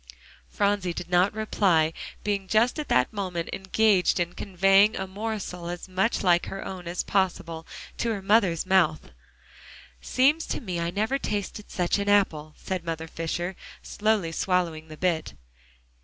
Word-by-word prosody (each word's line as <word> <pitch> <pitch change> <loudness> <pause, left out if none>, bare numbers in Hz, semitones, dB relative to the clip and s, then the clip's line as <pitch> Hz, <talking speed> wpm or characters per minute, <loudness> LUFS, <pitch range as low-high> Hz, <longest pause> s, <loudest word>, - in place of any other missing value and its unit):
Phronsie 200 -3 0
did 175 - -6
not 180 +2 +4
reply, 185 -7 +2 0.3
being 200 -2 -1
just 230 - +2
at 300 - -4
that 125 +8 +2
moment 185 -5 -3
engaged 195 -1 +2
in 175 0 -1
conveying 195 +2 +3
a 190 - -3
morsel 190 -3 -5
as 175 +1 -6
much 190 +5 0
like 175 -2 +3
her 195 - -6
own 180 -2 -7
as 175 +1 -2
possible, 170 -4 -1 0.3
to 235 - 0
her 200 -3 -4
mother's 195 -5 +3
mouth. 175 - +2 0.9
"Seems 290 +6 +2
to - - -2
me 180 -6 -4
I 170 0 -1
never 215 +9 -1
tasted 205 -2 -4
such 180 +2 0
an 200 0 -1
apple," 155 -7 +2
said 185 -3 -4
Mother 165 -1 -4
Fisher, 175 +3 -3 0.3
slowly 210 -5 0
swallowing 165 -3 -1
the 155 -1 -10
bit. 170 - -1
185 Hz, 155 wpm, -26 LUFS, 170-205 Hz, 0.9 s, not